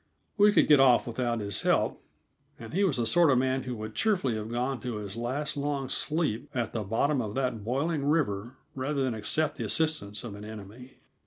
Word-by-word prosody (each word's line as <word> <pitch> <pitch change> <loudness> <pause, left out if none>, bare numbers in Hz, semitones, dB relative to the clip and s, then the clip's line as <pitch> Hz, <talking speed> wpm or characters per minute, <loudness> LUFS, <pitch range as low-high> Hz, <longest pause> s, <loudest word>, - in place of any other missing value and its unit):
We 210 0 +6
could - - +4
get 150 -2 +7
off 130 -3 +5
without 120 -1 -2
his 100 -2 -2
help, - - +1 0.6
and 115 -1 -10
he 195 +4 +2
was 175 -9 +2
the 120 - +1
sort 170 +6 +4
of 130 - +4
man 130 +1 +1
who 125 -1 -5
would 110 0 -6
cheerfully 185 - +1
have 110 0 -4
gone 125 +2 -1
to 125 -3 -4
his 105 -1 -6
last 130 +6 -3
long 140 -2 -2
sleep 150 -9 -1
at 120 -3 -2
the 115 - -2
bottom 125 +7 +1
of 105 -2 -5
that 125 -5 -1
boiling 140 +6 -1
river 130 -6 0 0.2
rather 135 +1 -1
than 130 -2 0
accept 130 +8 -1
the - - -3
assistance 155 -11 0
of 115 -4 -6
an 100 +1 -9
enemy. 110 +4 -10
125 Hz, 210 wpm, -28 LUFS, 110-145 Hz, 0.6 s, get